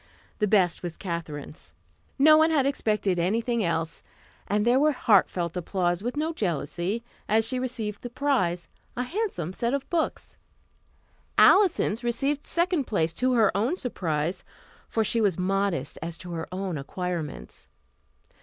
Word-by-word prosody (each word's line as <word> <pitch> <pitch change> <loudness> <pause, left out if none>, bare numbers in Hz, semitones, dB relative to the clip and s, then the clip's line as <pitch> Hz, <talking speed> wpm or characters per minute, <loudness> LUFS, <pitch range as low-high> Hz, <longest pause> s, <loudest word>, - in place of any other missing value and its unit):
The 210 - +2
best 190 -4 +3
was 175 -2 -6
Katherine's. 160 -5 -6 0.4
No 310 +3 +7
one 315 +1 +5
had 295 -5 +2
expected 210 -9 0
anything 225 +6 0
else, 165 -2 -2 0.5
and 210 +2 +1
there 245 +2 +4
was 300 0 +3
heartfelt 185 -7 +2
applause 175 0 -1
with 245 +6 -3
no 315 +2 0
jealousy, 180 - -2 0.3
as 220 +1 +3
she 255 +2 -2
received 230 -5 -4
the 245 - -6
prize, 240 -11 0 0.3
a 250 - 0
handsome 255 - -3
set 235 +6 0
of 280 - -4
books. 335 -2 -2 1.0
Alison's 365 - +5
received 275 +5 -1
second 340 -4 +1
place, 165 -7 0
to 255 +7 +1
her 225 -4 +3
own 240 - +1
surprise, 170 - -2 0.5
for 225 - +1
she 230 +2 +1
was 200 -6 +2
modest 185 -6 -1
as 165 +1 -5
to 180 - -9
her 165 -1 -4
own 185 -4 -3
acquirements. 170 +1 -5
210 Hz, 145 wpm, -26 LUFS, 175-255 Hz, 1.0 s, No